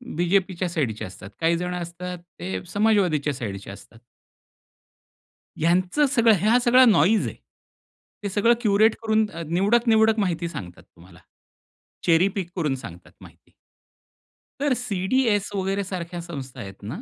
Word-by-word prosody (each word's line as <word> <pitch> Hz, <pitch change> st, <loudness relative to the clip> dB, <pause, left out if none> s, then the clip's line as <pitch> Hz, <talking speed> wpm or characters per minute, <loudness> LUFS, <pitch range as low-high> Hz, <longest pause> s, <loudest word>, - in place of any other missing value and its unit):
बीजेपीच्या 180 Hz, +1 st, 0 dB
साइडचे 135 Hz, -10 st, -2 dB
असतात. 95 Hz, +1 st, -11 dB
काही 165 Hz, +1 st, +2 dB
जण 180 Hz, +1 st, -3 dB
असतात 180 Hz, +1 st, -6 dB, 0.2 s
ते 95 Hz, +1 st, -4 dB
समाजवादीच्या 190 Hz, -9 st, +2 dB
साइडचे 100 Hz, -6 st, -6 dB
असतात. 100 Hz, +3 st, -14 dB, 1.6 s
ह्यांचं 180 Hz, -, +2 dB
सगळं 235 Hz, -5 st, +4 dB
ह्या 220 Hz, +6 st, +3 dB
सगळा 250 Hz, +2 st, +7 dB
नोईज 215 Hz, -1 st, +4 dB
आहे. -, -, -6 dB, 0.9 s
ते 200 Hz, -, -2 dB
सगळं 210 Hz, +5 st, +3 dB
क्युरेट 215 Hz, 0 st, +3 dB
करून 220 Hz, -1 st, +2 dB
अ, 170 Hz, -, -8 dB
निवडक 205 Hz, +8 st, +2 dB
निवडक 220 Hz, 0 st, +4 dB
माहिती 170 Hz, -4 st, -1 dB
सांगतात 90 Hz, -, -9 dB
तुम्हाला, 85 Hz, -1 st, -19 dB, 0.9 s
चेरी 170 Hz, +2 st, +4 dB
पिक 180 Hz, -3 st, -3 dB
करून 155 Hz, -7 st, 0 dB
सांगतात 90 Hz, -9 st, -11 dB
माहिती. -, -, -17 dB, 1.1 s
तर 285 Hz, -3 st, +2 dB
सी-डी-एस 210 Hz, 0 st, 0 dB
वगैरे 195 Hz, +1 st, -1 dB
सारख्या 175 Hz, -2 st, -6 dB
संस्था 140 Hz, -7 st, -8 dB
आहेत 95 Hz, 0 st, -10 dB
ना, 110 Hz, -, -6 dB
180 Hz, 135 wpm, -24 LUFS, 150-215 Hz, 1.6 s, सगळा